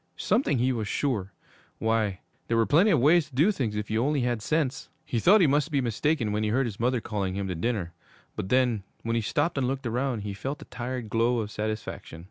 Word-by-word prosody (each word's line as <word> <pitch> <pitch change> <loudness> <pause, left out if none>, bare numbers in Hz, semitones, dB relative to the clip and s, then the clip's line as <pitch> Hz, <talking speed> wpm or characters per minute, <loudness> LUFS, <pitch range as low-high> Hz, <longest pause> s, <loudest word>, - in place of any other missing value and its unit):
Something 235 - +1
he 125 +2 +2
was 110 -3 -3
sure. 105 -10 -1 0.5
Why, 110 -4 0 0.3
there 115 - +1
were 115 - +4
plenty 175 - +4
of 165 - +4
ways 155 +3 +4
to 135 - -15
do 160 +10 +4
things 125 - -2
if 105 0 -4
you 110 +2 +1
only 145 0 +1
had 120 -2 -1
sense. 150 0 -1 0.2
He 125 -6 -1
thought 195 - +6
he - - +6
must 145 +2 +2
be 145 -3 +1
mistaken 120 0 0
when 105 +1 0
he 110 - 0
heard 130 +5 +2
his 110 -4 -5
mother 125 +1 +1
calling 100 -4 -3
him 100 -1 -2
to - - -1
dinner; 90 -1 -2 0.4
but 95 - -4
then, 125 -4 +2 0.2
when 115 0 -1
he 115 - +1
stopped 140 +7 0
and 130 - +1
looked 135 +1 -3
around, 120 0 -1
he 100 -1 -4
felt 135 +8 -5
a - - -15
tired 120 -2 -5
glow 115 +2 +2
of 110 -2 -3
satisfaction. 110 -6 -5
120 Hz, 235 wpm, -27 LUFS, 110-140 Hz, 0.5 s, thought